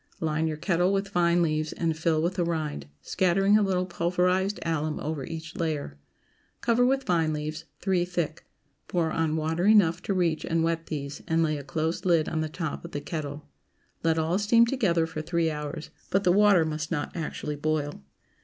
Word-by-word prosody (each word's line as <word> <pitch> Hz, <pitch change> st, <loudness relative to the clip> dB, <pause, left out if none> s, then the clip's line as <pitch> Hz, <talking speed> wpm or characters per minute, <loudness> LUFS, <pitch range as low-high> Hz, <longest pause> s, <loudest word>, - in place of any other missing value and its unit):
Line 160 Hz, 0 st, 0 dB
your 155 Hz, -1 st, -3 dB
kettle 175 Hz, +2 st, +1 dB
with 195 Hz, 0 st, 0 dB
vine 175 Hz, -2 st, +3 dB
leaves 155 Hz, -1 st, -1 dB
and 165 Hz, -2 st, -1 dB
fill 160 Hz, 0 st, +1 dB
with 175 Hz, +2 st, +1 dB
the 180 Hz, -1 st, 0 dB
rind, 155 Hz, -, -3 dB, 0.2 s
scattering 195 Hz, +2 st, +3 dB
a 215 Hz, -, +5 dB
little 185 Hz, -2 st, +1 dB
pulverized 180 Hz, +3 st, 0 dB
alum 155 Hz, -2 st, -1 dB
over 150 Hz, -2 st, -3 dB
each 160 Hz, +1 st, -7 dB
layer. 150 Hz, -, -3 dB, 0.6 s
Cover 235 Hz, +1 st, +2 dB
with 270 Hz, +2 st, +2 dB
vine 165 Hz, -4 st, +1 dB
leaves, 155 Hz, +2 st, -4 dB, 0.2 s
three 190 Hz, -3 st, +2 dB
thick; 175 Hz, -3 st, -3 dB, 0.4 s
pour 165 Hz, -3 st, 0 dB
on 160 Hz, -1 st, 0 dB
water 160 Hz, +4 st, 0 dB
enough 180 Hz, -5 st, +5 dB
to 195 Hz, -, -2 dB
reach 170 Hz, -4 st, +1 dB
and 165 Hz, -1 st, 0 dB
wet 165 Hz, 0 st, -1 dB
these, 140 Hz, -2 st, -5 dB
and 165 Hz, -1 st, +2 dB
lay 155 Hz, -1 st, +1 dB
a 145 Hz, -, -6 dB
close 160 Hz, +4 st, -2 dB
lid 170 Hz, -4 st, +3 dB
on 160 Hz, -, -1 dB
the 155 Hz, -, -2 dB
top 160 Hz, -1 st, -4 dB
of 170 Hz, -, -9 dB
the 145 Hz, -, -2 dB
kettle. 145 Hz, -1 st, -5 dB, 0.5 s
Let 165 Hz, 0 st, +2 dB
all 165 Hz, +4 st, +1 dB
steam 230 Hz, +3 st, +5 dB
together 195 Hz, -10 st, +1 dB
for 160 Hz, -1 st, -5 dB
three 165 Hz, 0 st, 0 dB
hours; 150 Hz, 0 st, -6 dB, 0.2 s
but 195 Hz, +1 st, +1 dB
the 180 Hz, -, +4 dB
water 200 Hz, -3 st, +5 dB
must 155 Hz, 0 st, -3 dB
not 155 Hz, -4 st, -3 dB
actually 150 Hz, -2 st, -4 dB
boil. 150 Hz, -, -2 dB
165 Hz, 190 wpm, -27 LUFS, 155-180 Hz, 0.6 s, a